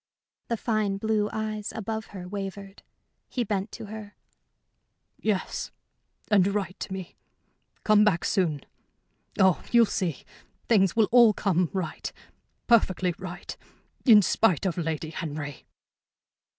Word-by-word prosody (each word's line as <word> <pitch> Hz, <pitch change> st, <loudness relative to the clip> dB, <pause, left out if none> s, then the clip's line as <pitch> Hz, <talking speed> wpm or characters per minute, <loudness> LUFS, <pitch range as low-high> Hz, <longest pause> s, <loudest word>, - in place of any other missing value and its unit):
The 235 Hz, -, -1 dB
fine 215 Hz, -3 st, 0 dB
blue 215 Hz, 0 st, 0 dB
eyes 215 Hz, -1 st, -3 dB
above 220 Hz, 0 st, -4 dB
her 185 Hz, -3 st, -8 dB
wavered. 195 Hz, 0 st, -6 dB, 0.5 s
He 245 Hz, -, -1 dB
bent 200 Hz, -1 st, -2 dB
to -, -, -7 dB
her. 210 Hz, -1 st, -9 dB, 1.0 s
"Yes. 210 Hz, -4 st, -2 dB, 0.6 s
And 195 Hz, -3 st, +5 dB
write 190 Hz, -3 st, -3 dB
to -, -, -6 dB
me. 190 Hz, -2 st, -7 dB, 0.7 s
Come 210 Hz, -1 st, +5 dB
back 200 Hz, -5 st, +2 dB
soon. 165 Hz, -8 st, 0 dB, 0.7 s
Oh, 190 Hz, -2 st, +4 dB
you'll 235 Hz, -1 st, +6 dB
see. 180 Hz, -8 st, -2 dB, 0.4 s
Things 195 Hz, -6 st, +3 dB
will 220 Hz, -2 st, +4 dB
all 235 Hz, -3 st, +7 dB
come 180 Hz, -4 st, +1 dB
right, 180 Hz, -5 st, -4 dB, 0.5 s
perfectly 190 Hz, -6 st, +3 dB
right, 180 Hz, -1 st, -7 dB, 0.5 s
in 215 Hz, -6 st, +7 dB
spite 190 Hz, -3 st, +2 dB
of 185 Hz, -, 0 dB
Lady 160 Hz, -2 st, -3 dB
Henry." 150 Hz, -4 st, -6 dB
195 Hz, 125 wpm, -27 LUFS, 180-215 Hz, 1.0 s, all